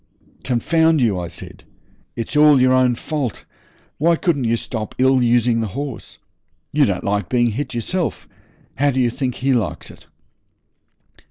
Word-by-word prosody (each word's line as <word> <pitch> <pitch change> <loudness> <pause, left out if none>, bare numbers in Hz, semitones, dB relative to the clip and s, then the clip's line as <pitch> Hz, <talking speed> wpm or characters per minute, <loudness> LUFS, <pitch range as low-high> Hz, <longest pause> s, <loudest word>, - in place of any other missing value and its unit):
'Confound 160 +6 +2
you,' 110 -7 +1
I 85 - -4
said, 85 - -10 0.5
'it's 115 +5 -5
all 150 -2 +6
your 130 0 +4
own 130 -1 +3
fault. 140 -2 -4 0.5
Why 165 +3 +3
couldn't 160 - 0
you 115 0 +2
stop 110 -2 -5
ill 130 0 +3
using 120 -1 +2
the 110 - -2
horse? 140 -4 -6 0.6
You 145 -1 +4
don't 95 -6 -2
like 100 -3 -1
being 120 -2 +2
hit 130 +2 -4
yourself. 170 +10 -3 0.5
How 145 +3 +2
do 130 -1 -1
you 120 -2 +2
think 125 -1 -3
he 135 +1 0
likes 115 -7 -2
it?' - - -18
125 Hz, 160 wpm, -20 LUFS, 115-145 Hz, 0.6 s, all